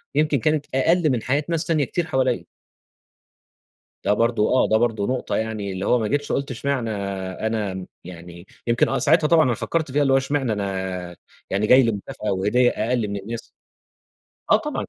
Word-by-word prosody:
يمكن 150 -2 +2
كانت 150 +3 +1
أقَل 160 +4 +3
من 120 -3 -1
حياة 140 +3 0
ناس 165 -1 -1
تانية 155 -4 +1
كتير 175 +4 -2
حواليّا. 130 -4 0 1.6
ده 105 - +4
برضه 115 0 +1
آه. 130 - +3
ده 110 - +5
برضه 110 -3 0
نقطة 130 0 -2
يعني 110 -3 -3
اللي 95 +1 -4
هو 125 - +3
ما 110 - -1
جِتش 145 +3 -1
قُلت 140 -1 -1
إشمعنى 130 -1 -2 0.6
أنا 105 -4 -2
م 95 -1 -6 0.2
يعني 85 0 -11 0.2
يمكن 120 +1 +2
آه - - 0
ساعتها 155 +1 +3
طبعًا 160 -1 +5
أنا 125 - +2
فكّرت 155 +4 -2
فيها، 145 +2 +2
اللي 135 -1 +3
هو - - +6
إشمعنى 135 -4 0
أنا 95 -3 -4 0.3
يعني 100 +2 0
جاي 130 +1 +7
لي 115 - +2
مكافأة 105 +1 -4
وهدية 105 +6 +2
أقَل 115 0 -1
من 100 0 -4
الناس. 115 +4 -8 1.0
آه - - +8
طبعًا. - - -4
120 Hz, 185 wpm, -23 LUFS, 105-140 Hz, 1.6 s, آه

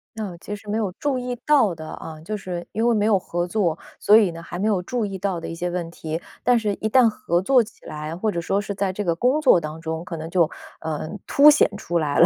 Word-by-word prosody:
那 205 -5 -5
其 205 +4 -6
实 205 +1 -14
没 215 - 0
有 210 -4 -1
注 280 -3 0
意 250 0 -3
到 260 - +4
的 160 -1 -8
啊， 160 -1 -8
就 215 +6 -4
是 180 -3 -6
因 225 +2 0
为 235 - +3
没 210 0 +2
有 210 -3 +4
合 175 -1 -3
作， 175 -4 0 0.2
所 210 +2 +6
以 200 -6 +4
呢， 165 - -9
还 175 +1 -7
没 205 +4 0
有 195 -4 +2
注 235 +3 -2
意 195 -1 -4
到 190 -2 -2
的 - - -6
一 - - -5
些 175 +1 -3
问 175 -1 -3
题。 160 -1 -4 0.2
但 245 -1 +4
是 210 -3 0
一 220 - -2
旦 250 0 +6
合 175 -5 0
作 250 +5 +4
起 215 - -16
来， 155 +2 -5
或 215 +2 0
者 170 - -2
说 195 +4 0
是 200 0 -4
在 195 -1 -1
这 205 +3 -3
个 170 - +1
工 255 - +2
作 255 - +6
当 155 +1 -6
中 160 +1 -4
可 165 -2 -5
能 160 +1 -6
就， 170 -3 +3 0.3
呃， 155 -1 -3 0.2
凸 295 +2 +8
显 295 - +4
出 175 -5 -1
来 145 -2 -1
了， 170 - +8
190 Hz, 295 characters per minute, -23 LUFS, 170-220 Hz, 0.3 s, 凸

